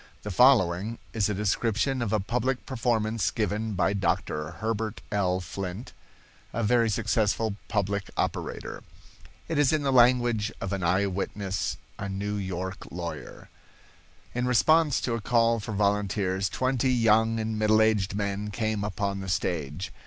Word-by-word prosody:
The 105 - -4
following 110 -2 +4 0.2
is 105 -3 +1
a 105 - -1
description 115 +6 0
of 110 -4 -1
a 110 - +2
public 125 +5 -1
performance 115 -5 0
given 110 0 -2
by 95 - +2
Dr. 75 -5 -1
Herbert 110 +3 -3
L. 95 -3 +1
Flint, 95 +4 -6 0.6
a 115 - -1
very 115 +1 +3
successful 105 0 0
public 100 -2 -1
operator. - - -3 0.7
It 165 -3 -1
is 145 -3 +4
in 155 -2 +1
the 135 -1 +1
language 120 -3 +4
of 95 0 -3
an 100 - -2
eye 95 +4 +2
witness—a 100 0 -4
New 100 +2 -3
York 95 0 -4
lawyer. 85 -3 -7 0.9
In 125 +1 -1
response 150 +4 +4
to 120 - -1
a 115 - -2
call 115 0 +3
for 110 - -6
volunteers, 100 -1 0
twenty 130 +2 +1
young 115 -1 +3
and 110 0 -2
middle 110 0 +4
aged 105 -3 +2
men 100 0 -2
came 110 -1 -2
upon 100 -1 -2
the 95 -1 -5
stage. 85 0 -2
105 Hz, 145 wpm, -27 LUFS, 100-115 Hz, 0.9 s, following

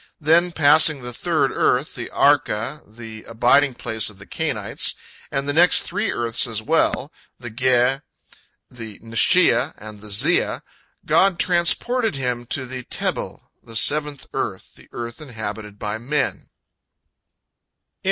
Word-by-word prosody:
Then, 170 +3 +3
passing 155 -2 +5
the 125 0 -5
third - - 0
earth, - - 0
the - - -7
Arka, 115 +8 +1
the 110 0 -11
abiding 125 +4 +2
place 110 -2 -1
of 105 - -15
the 100 - -13
Cainites, - - -2 0.3
and 140 +1 -3
the 145 - -1
next 175 +4 +5
three 205 +4 -3
earths 115 +1 +1
as 110 -2 -2
well, 150 +2 0 0.3
the 120 -2 -8
Ge, 125 +2 +1 0.7
the 110 -4 -10
Neshiah, 130 +6 +2
and 105 -1 -11
the 105 - -10
Ziah, 100 - +2 0.4
God 195 -2 +2
transported 185 - +1
him 125 -3 -3
to 130 +1 -2
the 130 0 -7
Tebel, - - -4
the 115 - -12
seventh 145 +3 +1
earth, - - -5
the - - -19
earth 120 +3 -7
inhabited 110 -6 -7
by 105 +1 -4
men. 135 +3 -3
125 Hz, 135 wpm, -21 LUFS, 115-150 Hz, 0.7 s, passing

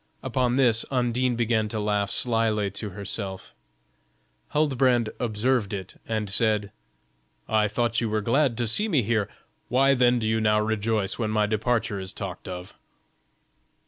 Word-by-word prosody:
Upon 125 -1 0
this 120 -4 +3
Undine 125 -1 0
began 110 -2 0
to 110 - -3
laugh 105 -1 0
slyly 110 -3 +1
to 105 +2 -5
herself; 100 -1 -5 0.9
Huldbrand 130 -6 +2
observed 115 -1 0
it, 95 -2 -7
and 110 -2 -2
said: 105 -1 +2 0.8
"I 110 -1 +2
thought 115 +2 0
you 115 - -1
were 110 0 0
glad 125 +2 +1
to 120 - 0
see 210 - +3
me 150 - +2
here; 105 -2 0 0.4
why 135 +3 +4
then 125 -1 +3
do 115 - -2
you 110 0 +1
now 105 0 +3
rejoice 110 -1 -1
when 110 -2 -1
my 105 -1 +2
departure 110 0 -1
is 95 0 -6
talked 95 -3 -7
of?" 90 0 -7
110 Hz, 150 wpm, -25 LUFS, 105-120 Hz, 0.9 s, why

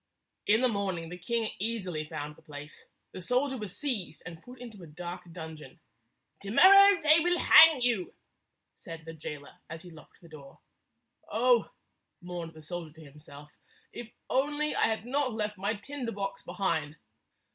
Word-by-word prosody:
In 215 +3 +4
the 255 - +4
morning 190 -7 -3
the 180 - -8
king 225 +4 -1
easily 190 -7 -2
found 150 -1 -6
the - - -20
place. 150 -1 -11 0.3
The 185 - -8
soldier 255 +8 0
was 205 -5 -6
seized 225 - -3
and 165 -2 -9
put 250 +4 -13
into 230 -5 -10
a 170 - -11
dark 175 +2 -8
dun 160 -2 -8
geon. 155 +3 -14 0.6
"To 200 - -7
morrow 395 - +7
they 310 +1 +7
will 350 +2 +1
hang 320 -5 +7
you," 230 -7 0 0.6
said 165 -1 -10
the 165 - -8
jailer, 150 -2 -9
as 165 +1 -8
he 180 - -12
locked 155 -2 -17
the 170 - -15
door. 140 -4 -13 0.7
"Oh," 240 +2 +3 0.5
mourned 175 -3 -7
the 155 - -13
soldier 165 -1 -7
to 160 -1 -13
himself, 150 0 -14 0.4
"if 240 - -7
I - - -26 0.2
only 295 +3 +1
had 220 -1 0
not 265 0 -1
left 210 -1 -3
my 200 +3 -1
tinder 250 +2 -6
box 195 -1 -5
behind!" 165 -5 -2
195 Hz, 170 wpm, -29 LUFS, 160-245 Hz, 0.7 s, morrow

